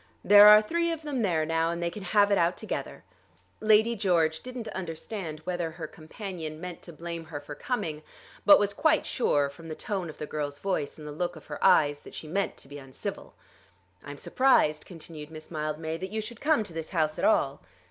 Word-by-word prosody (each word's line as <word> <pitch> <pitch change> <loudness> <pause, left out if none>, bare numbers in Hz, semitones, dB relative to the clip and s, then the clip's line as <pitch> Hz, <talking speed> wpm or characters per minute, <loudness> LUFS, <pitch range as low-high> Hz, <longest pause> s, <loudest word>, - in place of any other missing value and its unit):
There 205 +1 +9
are 210 0 +9
three 335 +7 0
of 325 -1 -5
them 285 -5 -2
there 165 -7 +1
now, 165 +1 +1
and 170 0 -3
they 170 0 -1
can 210 - -8
have 205 +2 +3
it 200 - +4
out 170 +1 +2
together." - - -5 0.6
Lady 220 +2 +4
George 170 -6 +2
didn't 250 -2 -7
understand 165 -2 -6
whether 175 0 -2
her 160 0 -7
companion 160 0 -7
meant 180 0 -7
to 170 - -10
blame 170 0 -6
her 155 -2 -6
for 145 0 -9
coming, 160 - -3 0.4
but 205 - +9
was 200 0 0
quite 315 +9 +2
sure, 145 - +1
from 140 +4 -12
the 155 - -5
tone 190 -3 -3
of 155 - -10
the 150 - -5
girl's 145 -1 -4
voice 165 -4 -2
and 150 -1 -9
the - - -6
look 175 +3 -3
of 155 - -13
her 150 - -7
eyes, 145 -1 +5
that - - -13
she 155 - -7
meant 195 +5 -1
to - - -10
be 145 +1 -9
uncivil. 135 -1 -7 0.7
"I - - -10
am 145 - -7
surprised," 155 - +2
continued 160 -3 -9
Miss 155 0 -11
Mildmay, 155 +1 -3
"that 190 +3 -5
you 220 +2 -3
should 220 +1 -7
come 300 -7 +3
to 195 -5 -10
this 160 -1 -5
house 155 -3 0
at - - -3
all." 135 - +2
170 Hz, 220 wpm, -28 LUFS, 155-205 Hz, 0.7 s, There